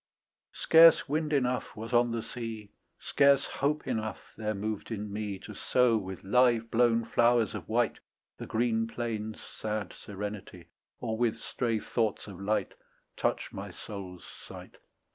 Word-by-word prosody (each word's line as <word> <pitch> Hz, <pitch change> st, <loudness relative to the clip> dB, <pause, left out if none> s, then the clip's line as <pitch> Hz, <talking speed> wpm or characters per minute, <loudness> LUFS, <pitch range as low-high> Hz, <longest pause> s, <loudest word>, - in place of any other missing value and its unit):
Scarce 165 Hz, 0 st, +7 dB
wind 155 Hz, +1 st, -1 dB
enough 125 Hz, -3 st, 0 dB
was 115 Hz, +3 st, -7 dB
on 120 Hz, 0 st, +4 dB
the 115 Hz, -1 st, -2 dB
sea, 110 Hz, -3 st, -7 dB, 0.3 s
Scarce 140 Hz, -1 st, +3 dB
hope 150 Hz, +2 st, -1 dB
enough 110 Hz, -1 st, -4 dB
there 110 Hz, -1 st, -2 dB
moved 105 Hz, +1 st, -4 dB
in 105 Hz, -2 st, -5 dB
me, 105 Hz, -2 st, -3 dB
To -, -, -10 dB
sow 125 Hz, -2 st, +2 dB
with 95 Hz, -3 st, -4 dB
live 115 Hz, +1 st, +3 dB
blown 115 Hz, -1 st, +3 dB
flowers 120 Hz, -2 st, +3 dB
of 95 Hz, -6 st, -7 dB
white 120 Hz, +1 st, +1 dB, 0.4 s
The -, -, -6 dB
green 115 Hz, 0 st, +1 dB
plain's 110 Hz, -2 st, -4 dB
sad 110 Hz, -1 st, -5 dB
serenity, 100 Hz, -4 st, -7 dB, 0.3 s
Or 110 Hz, 0 st, -3 dB
with 120 Hz, -2 st, +1 dB
stray 115 Hz, -3 st, -2 dB
thoughts 110 Hz, -1 st, -1 dB
of 95 Hz, -3 st, -10 dB
light 105 Hz, +2 st, 0 dB, 0.4 s
Touch -, -, -1 dB
my -, -, -6 dB
soul's 95 Hz, -3 st, -9 dB
sight. -, -, -12 dB
110 Hz, 145 wpm, -30 LUFS, 105-120 Hz, 0.4 s, Scarce